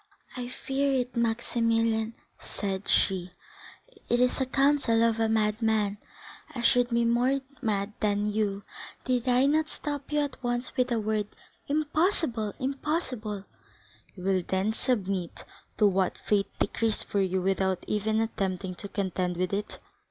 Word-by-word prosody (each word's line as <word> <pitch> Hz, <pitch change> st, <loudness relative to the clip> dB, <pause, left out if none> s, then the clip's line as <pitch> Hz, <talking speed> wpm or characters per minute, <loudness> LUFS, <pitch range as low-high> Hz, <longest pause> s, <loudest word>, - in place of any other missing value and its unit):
"I 250 Hz, -1 st, -4 dB
feared 270 Hz, +2 st, 0 dB
it, 250 Hz, 0 st, -1 dB
Maximilian," 230 Hz, -1 st, +1 dB, 0.2 s
said 195 Hz, -1 st, -4 dB
she; 185 Hz, -2 st, +2 dB, 0.8 s
"it 240 Hz, -, +3 dB
is 250 Hz, +2 st, +3 dB
the 265 Hz, -, +1 dB
counsel 270 Hz, -4 st, +3 dB
of 230 Hz, -1 st, +2 dB
a 225 Hz, -1 st, +2 dB
madman, 215 Hz, -1 st, +1 dB, 0.5 s
and -, -, -17 dB
I 240 Hz, -, -2 dB
should 245 Hz, -1 st, +4 dB
be 235 Hz, -1 st, +2 dB
more 245 Hz, +4 st, +3 dB, 0.2 s
mad 210 Hz, -3 st, -1 dB
than 205 Hz, -1 st, +1 dB
you, 205 Hz, -1 st, 0 dB, 0.4 s
did 250 Hz, -1 st, 0 dB
I 250 Hz, +1 st, +5 dB
not 310 Hz, +2 st, +2 dB
stop 290 Hz, -3 st, -5 dB
you 300 Hz, 0 st, +2 dB
at 285 Hz, -3 st, -4 dB
once 245 Hz, 0 st, -2 dB
with 250 Hz, -1 st, +2 dB
the 235 Hz, -2 st, 0 dB
word 215 Hz, -1 st, 0 dB, 0.4 s
'Impossible, 305 Hz, -, +1 dB
Morrel, 205 Hz, -, -5 dB
impossible!'" 255 Hz, -, -2 dB, 0.7 s
"You 180 Hz, -, -9 dB
will 190 Hz, -1 st, +2 dB
then 190 Hz, +4 st, 0 dB
submit 195 Hz, -8 st, -2 dB, 0.3 s
to 210 Hz, -, +4 dB
what 190 Hz, -2 st, +2 dB
fate 200 Hz, -2 st, +1 dB
decrees 225 Hz, -2 st, 0 dB
for 200 Hz, -, 0 dB
you 190 Hz, 0 st, +1 dB
without 190 Hz, -1 st, +1 dB
even 215 Hz, +1 st, +1 dB
attempting 190 Hz, -4 st, -2 dB
to 200 Hz, -, -7 dB
contend 185 Hz, -3 st, -1 dB
with 185 Hz, +1 st, -1 dB
it?" 205 Hz, +1 st, -3 dB
225 Hz, 150 wpm, -28 LUFS, 200-250 Hz, 0.8 s, I